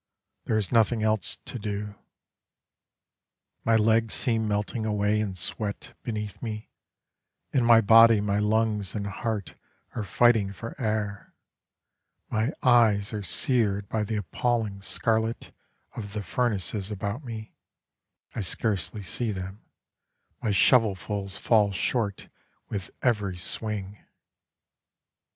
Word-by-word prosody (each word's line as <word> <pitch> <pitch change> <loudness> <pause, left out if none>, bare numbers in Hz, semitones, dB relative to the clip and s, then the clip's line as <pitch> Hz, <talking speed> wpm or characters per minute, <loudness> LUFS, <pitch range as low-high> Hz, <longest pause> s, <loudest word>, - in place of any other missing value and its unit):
There 110 - +1
is 105 -3 -1
nothing 115 -1 +3
else 110 -3 +1
to 125 - -6
do. 105 0 -4 1.7
My 115 - +3
legs 110 +1 +3
seem 115 -4 0
melting 105 +2 -1
away 105 0 +1
in 100 -3 -2
sweat 100 +3 -5
beneath 105 -3 -5
me: 110 -2 -6 0.8
In 130 - +3
my 115 -1 +7
body 115 +1 +7
my 100 0 0
lungs 105 -2 0
and 100 -1 -2
heart 105 0 -3 0.4
are 115 - -3
fighting 105 -1 +3
for 115 +4 -7
air, 105 -2 -2 1.0
My 110 +5 +1
eyes 115 -5 +4
are 105 - -3
seared 100 - +1
by 110 -1 0
the 110 +1 -3
appalling 105 0 -1
scarlet, 110 +3 -1 0.4
Of 100 -3 -6
the 105 -1 -3
furnaces 100 -2 -1
about 105 +6 -4
me 110 -3 -7 0.8
I - - -3
scarcely 100 +1 -1
see 110 +5 -1
them 95 +1 -6 0.8
My - - -1
shovelfuls 100 -1 +2
fall 105 -2 +3
short 100 +1 -1 0.4
with 100 -2 -4
every 105 -7 +1
swing. 100 +1 -4
105 Hz, 120 wpm, -27 LUFS, 100-115 Hz, 1.7 s, my